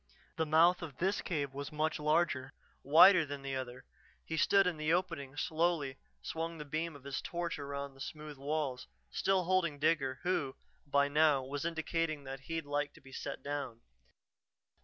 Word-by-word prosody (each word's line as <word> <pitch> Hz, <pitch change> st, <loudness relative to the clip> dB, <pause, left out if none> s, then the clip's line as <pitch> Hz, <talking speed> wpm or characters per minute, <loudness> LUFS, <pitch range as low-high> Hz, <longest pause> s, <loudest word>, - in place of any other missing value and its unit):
The 160 Hz, -3 st, 0 dB
mouth 170 Hz, +4 st, +5 dB
of 150 Hz, -6 st, -7 dB
this 190 Hz, +3 st, +1 dB
cave 145 Hz, -6 st, -2 dB
was 140 Hz, +1 st, -5 dB
much 155 Hz, +1 st, -1 dB
larger, 150 Hz, -3 st, +1 dB, 0.3 s
wider 170 Hz, +5 st, +8 dB
than 145 Hz, -2 st, -6 dB
the 135 Hz, -1 st, -3 dB
other. 130 Hz, -1 st, -6 dB, 0.4 s
He 160 Hz, -, -3 dB
stood 195 Hz, +4 st, +4 dB
in 180 Hz, -3 st, 0 dB
the 155 Hz, +1 st, 0 dB
opening, 165 Hz, -6 st, -1 dB
slowly 160 Hz, -4 st, 0 dB, 0.3 s
swung 165 Hz, +1 st, -3 dB
the 150 Hz, -, -7 dB
beam 155 Hz, +2 st, -3 dB
of 140 Hz, -, -13 dB
his 140 Hz, -1 st, -3 dB
torch 170 Hz, -4 st, -3 dB
around 140 Hz, 0 st, -5 dB
the 135 Hz, -, -15 dB
smooth 150 Hz, -2 st, -7 dB
walls, 140 Hz, -3 st, -2 dB, 0.2 s
still 190 Hz, -1 st, +2 dB
holding 170 Hz, -4 st, +1 dB
Digger, 140 Hz, -4 st, +1 dB
who, 145 Hz, -7 st, 0 dB, 0.3 s
by 140 Hz, 0 st, +3 dB
now, 145 Hz, -2 st, +4 dB
was 140 Hz, +3 st, -4 dB
indicating 165 Hz, -2 st, -1 dB
that 135 Hz, 0 st, -6 dB
he'd 160 Hz, +3 st, -4 dB
like 145 Hz, 0 st, -1 dB
to -, -, -14 dB
be 135 Hz, -, -15 dB
set 140 Hz, +1 st, -6 dB
down. 140 Hz, -5 st, -4 dB
150 Hz, 175 wpm, -33 LUFS, 140-165 Hz, 0.4 s, wider